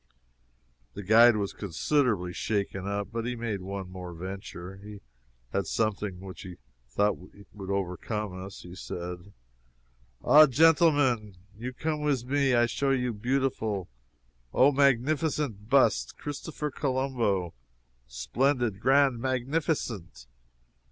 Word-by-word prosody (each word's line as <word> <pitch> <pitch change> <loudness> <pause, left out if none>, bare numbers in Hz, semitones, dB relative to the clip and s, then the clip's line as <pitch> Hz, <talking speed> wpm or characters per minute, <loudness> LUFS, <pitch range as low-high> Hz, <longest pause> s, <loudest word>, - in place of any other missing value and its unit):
The 100 - -6
guide 115 +4 +7
was 100 -2 -2
considerably 100 - 0
shaken 100 -2 -2
up, 100 -1 -2
but 115 0 -3
he 125 - -2
made 115 -4 -3
one 95 0 -5
more 90 -2 -8
venture. 95 0 -7
He 105 +1 -10 0.5
had 100 -4 0
something 105 -3 -1
which 95 -1 -9
he 90 -1 -9 0.3
thought 105 +12 +1
would 100 +1 -12
overcome 100 +2 -3
us. 95 0 -9
He 90 - -10
said: 90 0 -7 0.9
"Ah, 155 +1 +8
genteelmen, 145 - +3 0.2
you 120 +4 -5
come 150 +3 -3
wis 140 -5 0
me! 135 -1 +2
I 120 0 +5
show 135 +4 -1
you 125 -3 +1
beautiful, 110 -4 -1 0.7
O, 135 +3 +6
magnificent 140 -4 +1
bust 125 - +3
Christopher 150 +1 -5
Colombo! 130 - -1 0.5
splendid, 120 - 0
grand, 135 0 +3
magnificent!" 125 - -2
110 Hz, 120 wpm, -28 LUFS, 95-135 Hz, 0.9 s, Ah